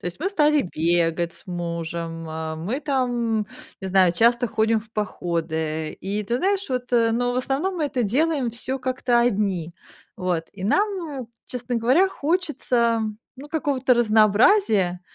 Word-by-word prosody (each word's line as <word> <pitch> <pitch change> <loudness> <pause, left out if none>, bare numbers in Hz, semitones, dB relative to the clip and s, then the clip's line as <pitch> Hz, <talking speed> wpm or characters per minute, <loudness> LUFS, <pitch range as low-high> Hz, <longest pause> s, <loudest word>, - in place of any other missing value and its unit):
То - - -6
есть, 175 - -5
мы 370 +5 -1
стали 300 -6 +3
бегать 170 0 0
с - - -17
мужем, 170 -1 -4
э, 160 0 -4
мы 210 - -3
там, 240 -6 0 0.3
не 190 - -5
знаю, 185 -2 +4
часто 235 +5 +3
ходим 220 +1 +1
в 220 0 -18
походы. 160 -6 -2
И 200 +3 -2
ты 235 +5 -1
знаешь, 390 +3 0
вот, 250 -1 -3
но 240 +1 +2
в - - -3
основном 285 +9 -1
мы 310 - 0
это 255 -4 -1
делаем 275 +3 +1
всё 260 +3 -4
как-то 255 -2 +1
одни, 195 -7 0 0.4
вот. 180 -3 -1
И 190 -1 -7
нам, 405 - +3 0.3
м, 230 - -9 0.2
честно 245 -1 -4
говоря, 265 +12 +4
хочется, 275 -9 0 0.4
ну, 285 +3 -10
какого-то 280 -5 +1
разнообразия, 215 - +4
230 Hz, 155 wpm, -23 LUFS, 180-260 Hz, 0.4 s, знаю